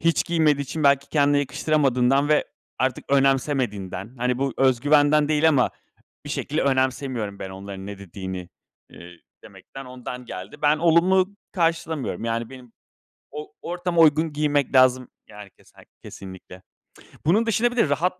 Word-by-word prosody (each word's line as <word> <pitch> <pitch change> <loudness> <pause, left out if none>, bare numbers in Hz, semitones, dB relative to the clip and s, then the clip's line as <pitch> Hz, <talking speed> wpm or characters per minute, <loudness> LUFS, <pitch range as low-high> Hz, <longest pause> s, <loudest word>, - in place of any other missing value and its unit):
hiç 165 -1 +1
giymediği 155 -4 +2
için 150 +2 -4
belki 140 0 +3
kendine 145 -1 +2
yakıştıramadığından 140 -1 +1
ve 150 - +3 0.3
artık 130 -1 -1
önemsemediğinden, 130 -7 0
hani, 125 +1 -1
bu 135 -1 -1
özgüvenden 145 +3 +3
değil 155 +1 +3
ama 140 -5 +2 0.6
bir - - -7
şekilde 150 +3 -2
önemsemiyorum 130 -6 -1
ben 95 - -6
onların 95 0 -9
ne 100 -1 -8
dediğini, 95 -1 -7 0.4
ııı, 85 +1 -12 0.3
demekten 135 0 -12
ondan 125 0 -8
geldi. 95 +3 -8
Ben 150 0 +3
olumlu 180 +4 +3 0.2
karşılamıyorum. 165 - -2
Yani 115 0 -2
benim 125 -3 -13 0.6
o 150 0 -8
ortama 175 -1 -1
uygun 155 0 +3
giymek 145 -2 0
lazım. 130 -1 +4 0.2
Yani 105 -1 -12
kese - - -20 0.2
kesinlikle. 95 -1 -11 0.7
Bunun 215 +8 +3
dışında 230 +2 +1
bir 245 - -9
de 225 - +3
rahat 175 +6 0
140 Hz, 140 wpm, -23 LUFS, 120-155 Hz, 0.7 s, lazım